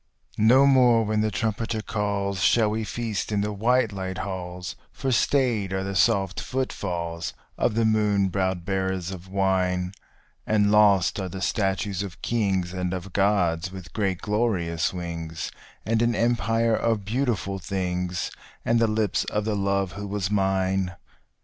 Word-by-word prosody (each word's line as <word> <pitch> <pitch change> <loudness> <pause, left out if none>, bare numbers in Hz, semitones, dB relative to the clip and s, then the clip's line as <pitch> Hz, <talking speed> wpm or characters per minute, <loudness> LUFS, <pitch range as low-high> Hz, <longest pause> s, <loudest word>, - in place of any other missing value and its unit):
No 125 +6 +6
more 125 -4 +5
when 105 0 +1
the 110 - +1
trumpeter 110 +1 -2
calls 100 -3 -1
shall 110 +1 +4
we 110 +1 -1
feast 110 -1 -3
in 105 -1 +1
the 105 +1 -1
white 115 +2 +2
light 95 -1 -4
halls; 90 -2 -5 0.2
For 135 -1 -2
stayed 120 -6 +2
are 95 0 -1
the 100 0 -3
soft 95 -4 +2
footfalls 85 -10 -3 0.2
of 115 - 0
the 115 0 +2
moon 105 -3 +2
browed 95 -2 -1
bearers 95 -1 -1
of 95 -1 -8
wine, 95 -1 0 0.5
And 105 -1 +3
lost 100 -3 +4
are 95 -1 -3
the 95 - -6
statues 95 0 0
of 95 -5 -7
Kings 95 -6 0
and 90 0 -2
of 90 0 -7
Gods 95 -3 +1
with 95 -3 -10
great 95 -5 -1
glorious 95 -7 0
wings, 85 -2 -5 0.3
And 115 0 +1
an 120 0 +2
empire 115 0 +2
of 110 -4 0
beautiful 110 -4 -1
things, 90 0 -2 0.3
and 115 0 +3
the 115 - +4
lips 110 -2 +1
of 105 0 -2
the 110 -1 0
love 100 -1 0
who 100 +1 -6
was 100 -1 -2
mine. 95 -2 +1
100 Hz, 155 wpm, -25 LUFS, 95-110 Hz, 0.5 s, No